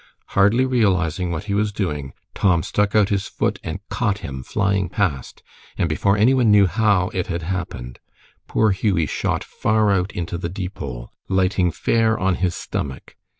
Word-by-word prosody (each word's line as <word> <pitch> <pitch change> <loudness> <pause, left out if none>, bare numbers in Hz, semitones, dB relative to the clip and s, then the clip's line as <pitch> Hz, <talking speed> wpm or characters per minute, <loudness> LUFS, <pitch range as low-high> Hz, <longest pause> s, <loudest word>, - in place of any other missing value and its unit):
Hardly 105 +6 +3
realizing 90 -8 +1
what 85 0 -3
he 100 -1 -3
was 105 +1 +1
doing, 75 -10 -3 0.2
Tom 85 -4 +2
stuck 105 0 0
out 105 -2 +4
his 100 -2 -1
foot - - -1
and - - -6
caught 100 -1 0
him 65 -2 -5
flying 100 +3 0
past, 85 - -2 0.3
and 85 - +1
before 100 +6 +1
any 115 +6 +4
one 125 -4 +3
knew 105 -1 +6
how 100 -2 +2
it 95 -5 -3
had 85 -2 -3
happened, 80 -9 -5 0.5
poor 110 -1 +2
Hughie 95 -4 +1
shot - - -2
far 110 -1 +1
out 95 0 +1
into 85 0 -4
the 85 - -3
Deepole, 85 -10 -6 0.2
lighting 95 -1 +2
fair 110 +4 +1
on 95 0 +1
his 90 -2 +1
stomach. 65 -3 -5
95 Hz, 170 wpm, -21 LUFS, 85-105 Hz, 0.5 s, knew